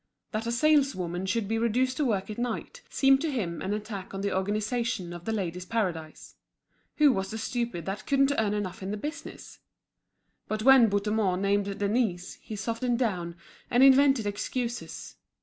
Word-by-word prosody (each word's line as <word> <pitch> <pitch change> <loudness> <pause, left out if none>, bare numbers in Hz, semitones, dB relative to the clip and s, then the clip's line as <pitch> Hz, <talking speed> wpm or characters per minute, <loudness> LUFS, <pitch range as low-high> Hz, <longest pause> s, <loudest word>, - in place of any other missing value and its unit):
That 220 0 -3
a - - 0
saleswoman 235 - +1
should 205 +2 0
be 225 +2 0
reduced 250 +3 +1
to 300 - +1
work 210 -4 -1
at 215 - -7
night, 240 -2 -4
seemed 270 0 +4
to 325 - -1
him 185 -11 -3
an 190 - -3
attack 205 -2 -5
on 195 - -4
the 200 -1 -1
organisation 210 -1 -1
of 175 0 -9
The 225 - -1
Ladies' 180 -4 -3
Paradise. 175 -8 -3 0.6
Who 300 -2 +6
was 190 -1 -2
the 220 - -5
stupid 225 -6 -3
that 195 +2 -5
couldn't 275 0 +3
earn 210 -1 +1
enough 195 -3 -4
in 190 - -4
the 210 - -3
business? 295 +9 -8 0.9
But 215 0 -2
when 265 -3 +7
Bouthemont 205 -2 0
named 200 0 0
Denise 200 -4 -1
he 215 - -7
softened 230 +3 -1
down, 180 -9 -1 0.3
and 245 +2 +4
invented 270 -3 +6
excuses. 235 +4 -4
215 Hz, 170 wpm, -28 LUFS, 195-245 Hz, 0.9 s, when